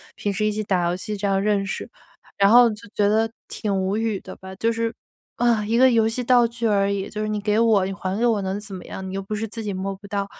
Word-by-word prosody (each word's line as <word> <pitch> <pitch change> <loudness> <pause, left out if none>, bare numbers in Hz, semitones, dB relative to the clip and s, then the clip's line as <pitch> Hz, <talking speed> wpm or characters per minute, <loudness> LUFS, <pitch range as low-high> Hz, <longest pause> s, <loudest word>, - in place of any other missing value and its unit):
平 205 - -2
时 215 +2 -1
一 215 - +2
起 215 - -2
打 185 -4 +1
游 175 - 0
戏 210 +3 -5
这 200 0 -1
样 195 0 +1
认 200 -1 +1
识， 195 - -5 0.5
然 200 0 +5
后 240 +1 +7
就 210 -1 -8
觉 205 -1 +3
得 220 +1 +2 0.2
挺 205 -2 -2
无 195 +3 0
语 220 -3 -1
的 - - -9
吧。 190 0 -10
就 230 +4 +1
是 230 0 -2 0.4
啊， 230 -3 +2
一 230 +2 +1
个 260 +1 +6
游 225 -2 +3
戏 230 +3 -2
道 245 -1 +4
具 235 0 -5
而 200 -2 +2
已， 195 -1 -3
就 215 0 -5
是 215 - -1
你 210 -1 -2
给 210 +2 +1
我 220 -5 +4
你 195 - -3
还 195 0 -3
给 235 - +1
我 225 -4 +2
能 190 +1 -2
怎 205 -2 -10
么 185 - -8
样， 190 - -7
你 190 - -6
又 195 - -2
不 205 +2 -5
是 220 - -2
自 225 - -6
己 205 -2 -3
摸 195 +1 -3
不 200 +1 -12
到， 200 0 -2
210 Hz, 310 characters per minute, -23 LUFS, 195-225 Hz, 0.5 s, 后